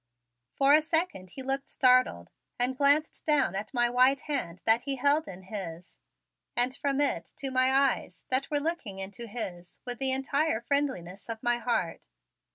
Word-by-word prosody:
For 275 +1 +4
a 305 - +6
second 315 - -1
he 265 - -4
looked 270 +1 -3
startled 250 - +2 0.3
and 250 +2 +2
glanced 285 +3 +3
down 295 -7 +3
at 200 +2 -5
my 240 -2 +2
white 255 +3 +3
hand 245 - -2
that 225 +1 +5
he 275 +2 -3
held 285 +4 +2
in 190 0 -10
his 180 -3 -8 0.6
and 250 +2 +2
from 280 -1 -2
it 225 -13 0
to 275 -1 -4
my 255 0 +3
eyes 265 - 0
that 260 +1 0
were 290 - +1
looking 285 - -3
into 195 +4 -7
his 180 -6 -7
with 245 -1 -3
the 265 -1 +3
entire 275 -1 0
friendliness 235 -9 -3
of 225 -1 -6
my 240 0 +1
heart. 230 - -2
255 Hz, 170 wpm, -28 LUFS, 200-280 Hz, 0.6 s, a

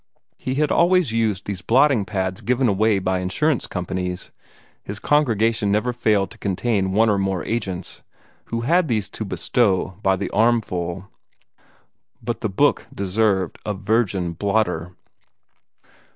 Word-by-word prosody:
He 130 - -3
had 150 +1 +1
always 175 -5 +3
used 110 -4 0
those 100 -3 -4
blotting 130 0 +3
pads 95 -2 -3
given 125 +1 +1
away 105 0 +2
by 95 -1 0
insurance 120 +11 0
companies 90 0 -4 0.5
his 100 - -7
congregations 115 -7 +2
never 110 +4 +1
failed 105 -4 +1
to - - -14
contain 100 0 0
one 110 +4 +3
or 105 -2 +2
more 95 -3 -1
agents, 95 -6 -4 0.4
who 115 0 -3
had 165 +7 +2
these 110 -6 0
to - - -5
bestow 100 -3 0
by 95 -1 +3
the - - -4
armful 100 -5 0 1.1
but - - -4
the - - -1
book - - +2
deserved 95 -2 0
a 105 - -3
virgin 100 -3 0
blotter. 90 -2 -1
105 Hz, 135 wpm, -22 LUFS, 95-115 Hz, 1.1 s, always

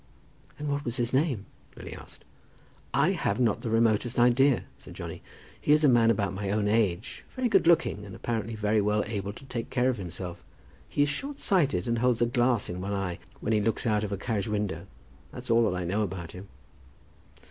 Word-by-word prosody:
"And 150 - -4
what 145 0 -1
was 120 -1 -2
his 120 0 -1
name?" 130 - +1 0.3
Lily - - -8
asked. - - -12 0.7
"I - - +3
have 100 +4 -1
not 115 -4 +2
the 120 - -3
remotest 115 +1 +2
idea," 125 +2 +4 0.2
said - - -12
Johnny. - - -7 0.4
"He 145 - +4
is 155 +1 +4
a - - +7
man 120 -3 +5
about 100 -3 +1
my 100 0 -3
own 105 +1 +1
age, 105 -2 0
very 255 -1 +1
good 195 -6 +3
looking, 160 -11 +3
and 100 -2 -9
apparently 115 -1 -3
very 105 0 +1
well 105 +1 +1
able 100 -2 -3
to 135 - -13
take 120 -3 -5
care 125 0 +2
of 125 - -5
himself. 90 -2 -6 0.5
He 145 - +2
is 145 - +1
short 275 - -4
sighted, 145 - +2
and 115 -1 +1
holds 125 -1 +2
a 120 - +4
glass 120 -2 +1
in 90 +1 -5
one 100 +2 -3
eye 95 -3 -2 0.2
when 110 - 0
he 105 - +3
looks 115 +4 0
out 105 -2 +2
of 105 - -3
a 100 - -1
carriage 105 -4 -2
window. 100 -5 -2 0.4
That's 125 -1 -6
all 115 0 +4
that 90 - -2
I - - -2
know 100 +5 0
about 90 -4 -4
him." 95 +2 -10
115 Hz, 210 wpm, -28 LUFS, 100-125 Hz, 0.7 s, a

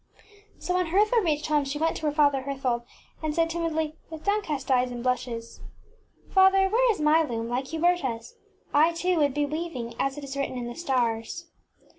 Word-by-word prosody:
ŌĆÖ - - -18
So, 360 - -1
when 365 -1 +1
Hertha 420 +7 +3
reached 305 -5 0
home, 300 -1 +2
she 275 +1 -4
went 325 +2 0
to 310 - -2
her - - +2
father 285 -2 +3
Herthold, 260 -3 -2 0.3
and 310 -1 -2
said, 330 0 +2
timidly, 320 -2 -2
with 320 -1 -9
downcast 320 -11 -1
eyes 250 -1 +3
and 240 -1 -6
blushes, 245 -2 -3 0.7
ŌĆśFather 380 0 +6
ŌĆö 385 0 +3
where - - +4
is 415 - -4
my 305 +2 +5
loom, 230 -7 -3
like 250 +3 -2
Huber 340 +3 +2
taŌĆÖs? 235 -8 -4 0.4
I, 315 +3 +5
too, 355 +1 0
would 285 -2 +2
be 295 0 +1
weaving 295 -6 -4
as 275 +1 -1
it 290 - -7
is 275 0 -6
written 275 -2 -2
in 245 - -4
the 240 - -5
stars. 255 +3 -2
300 Hz, 205 wpm, -26 LUFS, 255-335 Hz, 0.7 s, ŌĆśFather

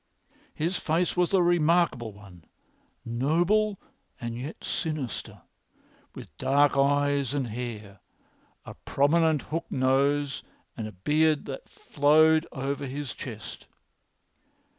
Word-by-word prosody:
His 170 +4 -1
face 170 +3 0
was 180 -1 +2
a 190 -2 +4
remarkable 170 -8 +2
one, 100 -5 -15 0.6
noble 175 - +1 0.4
and 115 -1 -5
yet 130 +6 -7
sinister, 155 - -4 0.7
with - - -11
dark 145 +1 +3
eyes 145 0 +2
and 140 -3 0
hair, 110 -4 -6 0.7
a - - -8
prominent 155 +1 +1
hooked 165 +2 -5
nose, 140 +2 +1 0.3
and 110 -2 -5
a - - -8
beard 150 - +1
which 135 - -5
flowed 155 +3 +3
over 140 0 -3
his 140 0 -5
chest. - - -9
145 Hz, 110 wpm, -27 LUFS, 130-160 Hz, 0.7 s, a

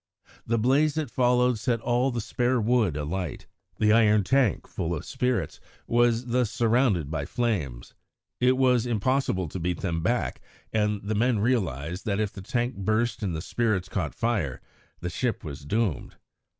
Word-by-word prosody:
The 115 - +1
blaze 140 +7 +3
that 155 -2 -2
followed 125 -2 +2
set 120 0 0
all 120 +3 +1
the 120 -2 -2
spare 120 +3 0
wood 110 -8 +2
alight. 80 +3 -4 0.3
The 105 0 +4
iron 105 -2 +5
tank, 130 -2 +2
full 85 +1 -3
of 75 - -6
spirits, 125 -1 -1 0.3
was 120 0 +2
thus 125 -2 +1
surrounded 115 - +1
by 75 -3 -2
flames. 85 - -2 0.5
It 125 +1 +3
was 125 -2 +3
impossible 115 -5 0
to 95 - -5
beat 90 0 -2
them 85 -4 -1
back, 120 +8 -1 0.3
and 105 -2 0
the 105 +2 -2
men 115 +2 +2
realised 90 - -1
that 100 -1 0
if 105 -2 -1
the 95 - -8
tank 120 +5 -2
burst 110 +5 0
and 95 -5 -2
the 80 - -4
spirits 110 -6 0
caught 90 -7 -3
fire, 100 - -1 0.4
the 90 - -3
ship 120 +2 -2
was 70 -2 -7
doomed. 100 - -1
110 Hz, 165 wpm, -26 LUFS, 90-125 Hz, 0.5 s, iron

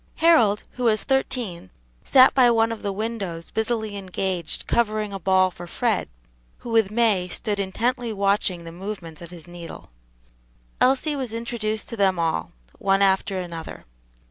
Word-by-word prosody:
Harold, 235 -12 +4
who 250 - -4
was 215 -2 +3
thirteen, 240 - -1 0.3
sat 260 0 +6
by 255 -2 +6
one 225 -1 +3
of 230 - -5
the 200 - -2
windows 195 -5 -4
busily 220 -2 -1
engaged 185 -3 -3
covering 215 -3 0
a 195 - -4
ball 185 0 +3
for 175 +1 -10
Fred, 220 +3 -1 0.5
who 240 - -8
with 225 -3 +3
May 210 -5 +2
stood 205 +3 -3
intently 235 +5 -1
watching 195 -3 0
the 165 - -8
movements 175 -3 -7
of 170 - -9
his 170 -3 -12
needle. 175 - -10 0.9
Elsie 275 +4 +3
was 260 -5 -3
introduced 225 -2 -3
to 230 - -5
them 190 -2 +3
all, 165 - -1 0.3
one 195 0 +3
after 190 0 +2
another. 170 -3 -7
205 Hz, 155 wpm, -24 LUFS, 185-230 Hz, 0.9 s, sat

